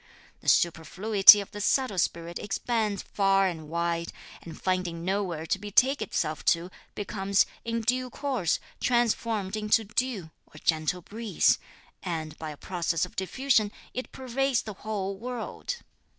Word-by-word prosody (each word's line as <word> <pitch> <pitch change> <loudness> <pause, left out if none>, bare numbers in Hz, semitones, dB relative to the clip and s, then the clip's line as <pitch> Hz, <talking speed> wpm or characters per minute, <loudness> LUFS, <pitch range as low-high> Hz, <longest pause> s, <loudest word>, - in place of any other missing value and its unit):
The - - -1
superfluity 195 +5 +6
of 200 - -10
the 205 - -6
subtle 250 -3 +1
spirit 170 0 -1
expands 215 0 -1
far 195 -1 +2
and 160 -5 -3
wide, 170 0 -1 0.3
and 165 -2 -10
finding 180 -3 -1
nowhere 185 -5 -1
to 195 - 0
betake 220 +6 +2
itself 155 -6 -2
to, 170 +2 +2 0.2
becomes, 200 -1 +1 0.2
in 230 0 -2
due 250 +3 0
course, 255 - -1 0.2
transformed 230 -4 +1
into 215 +1 +2
dew, 215 -6 -2 0.2
or - - -16
gentle 160 +2 0
breeze; 220 +2 +1 0.4
and, 160 -4 -4
by 160 - -5
a 150 - -8
process 175 0 -1
of 180 - -15
diffusion, 220 +2 +1 0.2
it 255 - -5
pervades 265 0 0
the 215 - -6
whole 200 -2 -3
world. 245 - -5
200 Hz, 140 wpm, -28 LUFS, 170-230 Hz, 0.4 s, superfluity